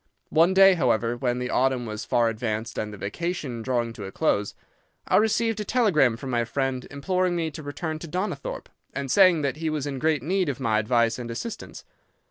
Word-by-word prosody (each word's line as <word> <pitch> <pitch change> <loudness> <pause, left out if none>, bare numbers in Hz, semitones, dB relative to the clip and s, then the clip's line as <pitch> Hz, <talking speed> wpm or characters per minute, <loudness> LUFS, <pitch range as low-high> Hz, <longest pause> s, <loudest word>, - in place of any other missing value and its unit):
One 170 +4 +4
day, 195 0 +8
however, 120 -7 +1
when 125 -1 -1
the 125 0 -3
autumn 130 -1 +1
was 105 -1 -5
far 120 -1 +2
advanced 115 0 -3
and 105 0 -3
the 105 - -9
vacation 135 - -4
drawing 120 -1 -1
to 105 -3 -8
a 95 - -7
close, 105 -9 0 0.5
I - - +4
received 225 +1 +2
a - - -1
telegram 175 - +3
from 130 +1 -6
my 120 -1 +1
friend 130 +1 -2
imploring 180 +5 0
me 165 -2 -1
to 155 - -8
return 155 +2 -4
to 170 - -8
Donnithorpe, 210 - -4 0.3
and 140 -2 -3
saying 185 -4 +5
that 140 +1 -1
he 160 0 -2
was 150 -2 -2
in 140 -2 -4
great 155 -2 +1
need 185 +1 0
of 140 - -3
my 110 -4 +1
advice 115 +1 +1
and 120 -1 -6
assistance. 165 - -7
135 Hz, 205 wpm, -25 LUFS, 120-170 Hz, 0.5 s, day